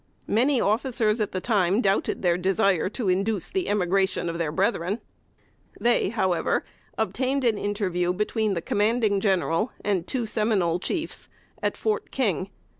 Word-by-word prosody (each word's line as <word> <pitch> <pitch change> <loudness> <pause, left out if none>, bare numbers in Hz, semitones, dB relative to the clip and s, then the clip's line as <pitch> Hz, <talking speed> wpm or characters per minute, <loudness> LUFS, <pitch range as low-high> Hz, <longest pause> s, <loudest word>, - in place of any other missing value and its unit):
Many 255 +4 +2
officers 220 0 +1
at 210 - -1
the 185 - -2
time 195 -2 +2
doubted 195 -3 0
their 175 -1 +3
desire 190 0 +2
to 220 0 -4
induce 195 +1 0
the 380 -2 -1
emigration 190 -2 +1
of 170 0 -4
their 160 -3 -1
brethren. 190 +3 0 0.8
They, 240 -4 +2
however, 190 -6 0 0.3
obtained 265 0 0
an 220 -3 +2
interview 185 -4 0
between 210 +2 0
the 170 - -3
Commanding 215 -1 +1
General 195 +1 +1
and 190 -4 0
two 250 -3 -1
Seminole 210 -6 +1
chiefs 325 - -4 0.3
at - - -1
Fort 435 -1 -1
King. - - -1
205 Hz, 145 wpm, -25 LUFS, 185-230 Hz, 0.8 s, their